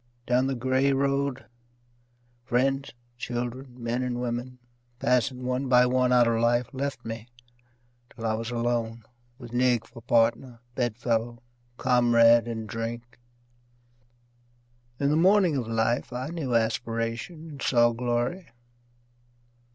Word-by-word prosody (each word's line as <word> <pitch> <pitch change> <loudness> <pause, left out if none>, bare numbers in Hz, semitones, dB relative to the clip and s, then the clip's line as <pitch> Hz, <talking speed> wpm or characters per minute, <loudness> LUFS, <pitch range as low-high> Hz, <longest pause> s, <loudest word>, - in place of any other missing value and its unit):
Down 125 +2 +2
the 135 - -1
grey 130 +3 +1
road, 140 0 0 1.0
friends, 135 +3 0 0.3
children, 125 +1 -5
men 120 +1 -2
and 125 -1 -2
women, 125 +1 -4 0.4
Passing 125 +1 0
one 130 +2 -1
by 125 0 +6
one 125 0 +2
out 120 -1 +5
of 115 -1 +1
life, 120 +1 +2
left 135 -2 -4
me 115 0 -6 0.8
till 115 - -8
I 110 - +1
was 115 +1 -3
alone 115 -1 -2 0.3
With 120 -3 -11
Nig 120 -2 +2
for 115 - -13
partner, 115 +1 +1
bed 120 -3 -1
fellow, 120 0 -2 0.3
comrade 120 -2 +4
in 110 -1 -4
drink. 115 +2 -6 1.8
In 140 0 +2
the - - +3
morning 185 -1 +4
of 125 -4 -2
life 115 +3 0
I 125 +3 -4
knew 150 -8 -2
aspiration 115 +7 -2
and 140 -2 -10
saw 120 -2 +4
glory. 120 +9 -2
120 Hz, 130 wpm, -27 LUFS, 115-130 Hz, 1.8 s, by